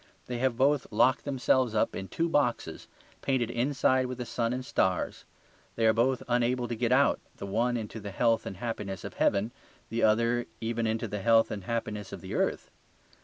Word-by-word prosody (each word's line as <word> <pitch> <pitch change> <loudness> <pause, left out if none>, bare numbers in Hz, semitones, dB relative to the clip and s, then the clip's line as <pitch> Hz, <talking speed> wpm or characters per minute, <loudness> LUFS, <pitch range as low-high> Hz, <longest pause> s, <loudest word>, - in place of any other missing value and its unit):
They 125 -1 -4
have 130 -2 +1
both 140 +1 +2
locked 120 +4 +3
themselves 130 -4 +1
up 105 - +1
in 95 - -5
two 165 - -1
boxes, 125 - -1 0.3
painted 125 -4 0
inside 130 +1 +2
with 125 0 -5
the 125 - -4
sun 115 0 -1
and 125 +1 -3
stars; 95 -7 0 0.5
they 115 - +1
are 110 - +5
both 125 +3 +1
unable 120 0 +1
to 120 - -3
get 120 +1 0
out, 140 +2 +4 0.2
the - - -6
one 115 +5 0
into 110 0 -6
the 100 -1 -6
health 115 +3 +1
and 95 - -6
happiness 105 -4 -4
of - - -6
heaven, 105 +4 +1 0.4
the 115 - -2
other 115 +2 +2
even 115 0 -1
into 115 +1 -1
the 105 0 -4
health 115 +1 +4
and 100 -3 -5
happiness 105 -3 -3
of - - -7
the - - -7
earth. - - -1
115 Hz, 195 wpm, -29 LUFS, 110-125 Hz, 0.5 s, are